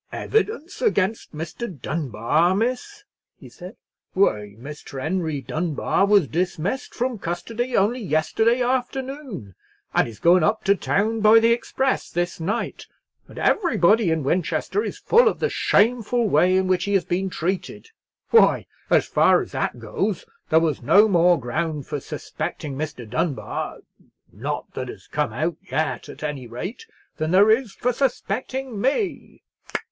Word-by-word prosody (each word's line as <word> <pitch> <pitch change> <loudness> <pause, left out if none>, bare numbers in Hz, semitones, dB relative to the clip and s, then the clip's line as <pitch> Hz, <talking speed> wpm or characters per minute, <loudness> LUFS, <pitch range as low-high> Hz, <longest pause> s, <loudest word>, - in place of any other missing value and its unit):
"Evidence 425 -6 -2
against 220 - 0
Mr. 165 - -6
Dunbar, 150 - 0
miss?" 255 - -2 0.4
he - - -12
said; - - -11 0.4
"why, 105 - +1
Mr. 140 0 -8
Henry 160 -1 -2
Dunbar 160 - 0
was 200 -7 +4
dismissed 180 - -2
from 245 -2 -2
custody 225 +9 -3
only 215 +6 +2
yesterday 220 - +1
afternoon, 260 - -3 0.4
and - - +3
is 115 -3 -10
going 175 - +5
up 210 +6 +1
to 200 - +4
town 220 +3 0
by 215 +1 +7
the 230 +1 +5
express 265 +2 -1
this 175 +1 -2
night, 165 +5 -3 0.4
and - - -15
everybody 220 - +3
in 160 -2 0
Winchester 180 - 0
is - - -5
full 470 +2 +4
of - - +1
the - - -1
shameful 235 +2 +2
way 180 +2 +4
in 190 - +2
which 185 -1 +1
he 200 0 0
has 195 - +2
been 190 +2 -1
treated. 185 - -4 0.4
Why, 460 - +5 0.2
as - - +4
far - - +4
as - - -12
that - - -2
goes, - - -3 0.2
there 160 - +5
was 160 -4 0
no 205 - +6
more 175 -3 +4
ground 150 +3 -3
for 150 -1 -4
suspecting 140 +1 -5
Mr. 135 -5 -5
Dunbar—not 130 +6 -3 0.9
that - - -4
has - - -10
come - - -2
out 155 +7 -2
yet, 160 -5 -2
at - - -10
any 145 -5 -4
rate—than 180 - -7
there 200 +5 +6
is 225 -2 +1
for 250 +4 -1
suspecting 260 -2 -2
me!" 320 - -2
190 Hz, 145 wpm, -23 LUFS, 155-240 Hz, 0.9 s, by